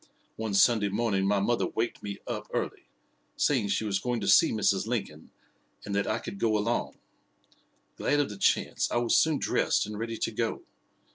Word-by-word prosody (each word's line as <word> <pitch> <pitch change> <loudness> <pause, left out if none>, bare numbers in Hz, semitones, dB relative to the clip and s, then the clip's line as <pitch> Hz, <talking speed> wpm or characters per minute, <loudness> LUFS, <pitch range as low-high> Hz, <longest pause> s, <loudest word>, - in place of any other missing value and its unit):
One 110 -2 -3
Sunday 105 0 +4
morning 100 -2 0
my 100 0 +2
mother 115 +4 +1
waked 115 +1 -3
me 100 -1 -5
up - - -5
early, - - -3 0.5
saying 125 -8 +2
she 100 +2 0
was 100 -2 0
going 125 +1 -2
to 100 - -3
see 100 - +6
Mrs. 105 -1 +1
Lincoln, 100 -10 -4 0.6
and 100 - -4
that 100 0 0
I 110 - 0
could 100 -3 -7
go 110 -2 +2
along. 115 +3 -2 1.0
Glad 145 - +1
of 145 - +1
the 105 - -8
chance, - - +1
I - - +1
was 120 -1 +2
soon 160 -2 +3
dressed - - +1
and 105 0 -7
ready 115 0 -4
to - - -2
go. - - -2
110 Hz, 190 wpm, -28 LUFS, 100-120 Hz, 1.0 s, see